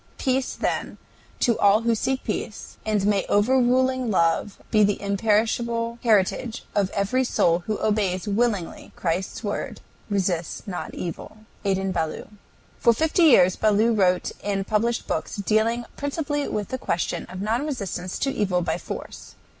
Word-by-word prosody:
Peace, 260 0 0
then, - - -2 0.4
to 235 -3 +2
all 205 +2 +5
who 230 0 +2
seek 260 +4 -1
peace, 215 - -5
and 210 -2 +1
may 205 -1 +2
overruling 255 +3 +3
love 170 +1 +1
be 215 -2 +5
the 205 0 +2
imperishable 230 +3 0
heritage 225 +2 +1
of 200 -2 +1
every 200 +7 0
soul 170 -8 +2
who 215 -1 -1
obeys 205 -3 0
willingly 205 -4 -1
Christ's 180 +5 -2
word, 205 -1 -3 0.3
"Resist 185 -1 -1
not 180 -3 -5
evil." 195 +5 -7 0.2
ADIN 195 -1 0
BALLOU. 165 -3 -3 0.5
For 235 - +5
fifty 320 - +2
years 185 - +6
Ballou 215 +2 +3
wrote 185 -4 +2
and 195 -1 -1
published 230 +3 0
books - - -3
dealing 220 +3 +1
principally 290 0 -2
with 210 -2 -3
the 260 - -3
question 170 - -2
of 185 +1 -8
non 220 +6 0
resistance 190 - -4
to 275 - 0
evil 185 -7 0
by 160 +1 -1
force. - - -8
210 Hz, 145 wpm, -24 LUFS, 195-235 Hz, 0.5 s, years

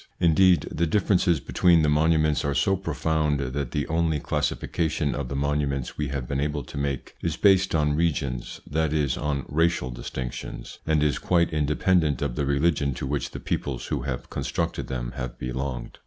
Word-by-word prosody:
Indeed, 90 +1 +5
the 85 +2 0
differences 90 -2 +2
between 85 +2 +3
the - - +3
monuments 75 0 +3
are 70 -1 -1
so 70 +8 +3
profound, 80 -4 0
that 70 0 -2
the 75 +3 -1
only 80 -1 +1
classification 75 0 -1
of 70 -3 -4
the 70 - -3
monu 70 +1 +1
ments 70 -2 -3
we 75 - -2
have 70 -2 -4
been 70 +1 -1
able 75 0 -1
to - - -11
make 70 -2 -3
is 85 -3 -2
based 95 -4 +4
on 75 -2 +2
regions, 70 -7 -1
that 80 0 0
is 70 -5 +1
on 70 -2 -2
racial 80 -4 +1
distinctions, - - -6
and 80 -2 +3
is 75 -3 +1
quite 85 -2 +2
independent 75 -1 +2
of 70 -4 -1
the 70 0 -1
religion 70 -1 +1
to 65 - -4
which 70 +1 -2
the - - -7
peoples - - -3
who - - -1
have 65 -3 -4
con - - -3
structed - - -2
them - - -4
have 65 -1 -5
belonged. 65 -1 -4
75 Hz, 185 wpm, -25 LUFS, 70-80 Hz, -, Indeed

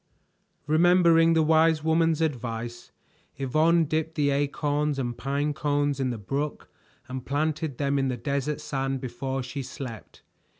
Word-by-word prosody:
Remembering 165 +1 +5
the 160 -1 +3
wise 160 0 +3
woman's 160 0 +2
advice, 120 -5 -3 0.5
Yvonne 155 +5 +3
dipped 160 +1 -2
the 145 -2 +2
acorns 145 +1 0
and 120 -3 -2
pine 140 +3 -1
cones 145 -1 0
in 130 -1 0
the 120 - -3
brook 140 +8 -4 0.4
and 130 0 -5
planted 150 0 -2
them 140 -1 0
in 135 - +1
the 125 -1 -2
desert 140 +4 -2
sand 135 -2 -2
before 130 +2 -4
she 130 +3 -5
slept. 125 -5 -9
145 Hz, 140 wpm, -26 LUFS, 135-155 Hz, 0.5 s, Remembering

